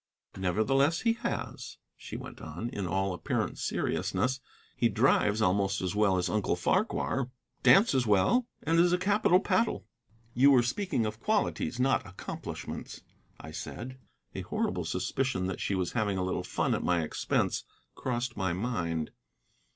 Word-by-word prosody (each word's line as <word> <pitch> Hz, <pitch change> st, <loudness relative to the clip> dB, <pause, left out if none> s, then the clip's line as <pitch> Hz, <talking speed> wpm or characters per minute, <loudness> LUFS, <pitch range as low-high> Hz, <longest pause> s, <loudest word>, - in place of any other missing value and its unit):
"Nevertheless, 125 Hz, -, +2 dB
he 230 Hz, -1 st, +3 dB
has," 235 Hz, -, -5 dB, 0.2 s
she -, -, -8 dB
went -, -, -9 dB
on, 85 Hz, +10 st, -5 dB
in 100 Hz, -5 st, -4 dB
all 95 Hz, +2 st, 0 dB
apparent 85 Hz, -, -2 dB
seriousness. 130 Hz, +1 st, -1 dB, 0.4 s
"He 120 Hz, -, +2 dB
drives 110 Hz, -1 st, +3 dB
almost 95 Hz, +1 st, +2 dB
as 90 Hz, -1 st, -2 dB
well 105 Hz, -3 st, +3 dB
as 90 Hz, 0 st, 0 dB
Uncle 105 Hz, 0 st, 0 dB
Farquhar, 135 Hz, -, 0 dB, 0.3 s
dances 140 Hz, -, +5 dB
well, 165 Hz, -, +3 dB, 0.2 s
and 165 Hz, +1 st, +2 dB
is 175 Hz, +1 st, +5 dB
a -, -, +4 dB
capital 190 Hz, -1 st, +3 dB
paddle." 225 Hz, +3 st, 0 dB, 0.5 s
"You 135 Hz, +4 st, +6 dB
were 130 Hz, -3 st, +6 dB
speaking 125 Hz, -, -1 dB
of 110 Hz, +1 st, -4 dB
qualities, 205 Hz, -, 0 dB
not 130 Hz, 0 st, +2 dB
accomplishments," 95 Hz, -, -7 dB, 0.4 s
I -, -, -9 dB
said. 130 Hz, +2 st, -7 dB, 0.3 s
A -, -, -4 dB
horrible -, -, -2 dB
suspicion 130 Hz, -9 st, -1 dB
that 95 Hz, -1 st, -3 dB
she 100 Hz, -, 0 dB
was 90 Hz, -2 st, -1 dB
having 105 Hz, -4 st, 0 dB
a 90 Hz, -, 0 dB
little 90 Hz, 0 st, -1 dB
fun -, -, 0 dB
at -, -, 0 dB
my 85 Hz, -2 st, +1 dB
expense 75 Hz, -, 0 dB, 0.3 s
crossed 120 Hz, -1 st, -3 dB
my 95 Hz, -3 st, -1 dB
mind. 85 Hz, -7 st, -2 dB
110 Hz, 150 wpm, -30 LUFS, 95-135 Hz, 0.5 s, You